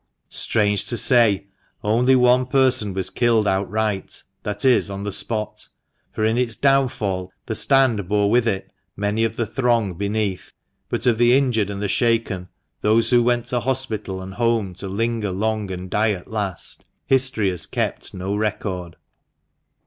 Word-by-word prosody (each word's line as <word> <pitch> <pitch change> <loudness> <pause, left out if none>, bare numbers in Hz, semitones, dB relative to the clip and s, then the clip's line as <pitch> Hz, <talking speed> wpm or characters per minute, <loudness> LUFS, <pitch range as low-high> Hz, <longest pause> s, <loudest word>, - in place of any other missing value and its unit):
Strange 105 -2 +1
to 120 - +1
say, 115 -4 +4 0.4
only 120 +5 +3
one 125 0 +4
person 130 -5 +3
was 95 -1 -2
killed 115 -3 +2
outright 100 +1 -1
— 95 0 -51
that 105 +5 -3
is, 125 -5 +4
on 100 0 -5
the 105 - -3
spot 105 +2 -3 0.2
— - - -47
for 110 - -1
in 110 +2 +1
its 120 -3 0
downfall 120 -10 0
the - - -3
stand 110 -3 +3
bore 105 -1 +2
with 120 0 +3
it 95 -3 -2 0.3
many 105 +2 0
of 115 -1 -1
the 115 - -1
throng 115 -6 0
beneath. 100 +1 -3 0.4
But - - -2
of 120 -3 +2
the 120 +2 +5
injured 120 -7 +1
and 100 0 -5
the - - 0
shaken, 115 -4 0 0.3
those 110 +3 +3
who 120 -1 +5
went 120 0 +1
to 125 -2 0
hospital 110 -7 -3
and 95 +1 -8
home 115 -4 0
to 95 - -5
linger 110 +1 -1
long 105 +1 -2
and 90 0 -6
die 105 +3 +1
at 90 -3 -8
last, 100 -5 -4 0.2
history 130 -7 +2
has 90 - -3
kept - - -3
no 95 +2 -4
record. 100 -5 -3
110 Hz, 170 wpm, -21 LUFS, 100-120 Hz, 0.4 s, the